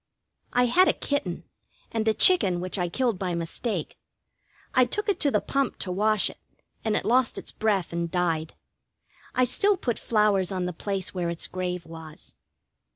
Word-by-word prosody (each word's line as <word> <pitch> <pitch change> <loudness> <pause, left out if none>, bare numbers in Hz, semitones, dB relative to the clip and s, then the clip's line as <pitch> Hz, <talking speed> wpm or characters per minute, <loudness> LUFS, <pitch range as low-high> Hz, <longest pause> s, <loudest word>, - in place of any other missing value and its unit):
I 245 0 +3
had 360 +10 +5
a - - +4
kitten, 200 -12 -2 0.5
and 225 -1 -1
a 220 - +4
chicken 195 - +5
which 185 +2 -3
I 175 -1 0
killed 235 0 0
by 180 -3 -2
mistake. 170 +3 -4 0.7
I 255 - +6
took 415 - -2
it 405 - +1
to 290 - +3
the - - +1
pump 275 -2 -1
to 185 - -4
wash 210 +2 +2
it, - - -8 0.4
and 220 -1 0
it - - -1
lost 245 +1 +2
its - - -4
breath 200 -6 0
and 170 0 -2
died. 165 -3 -1 0.8
I 255 - +4
still 395 - +2
put 240 -8 -2
flowers 210 -4 +2
on 185 -2 -2
the 180 - -3
place 195 +2 -3
where 175 -2 -2
its 170 -1 -4
grave 180 -2 -4
was. 160 -1 -10
195 Hz, 180 wpm, -26 LUFS, 180-245 Hz, 0.8 s, I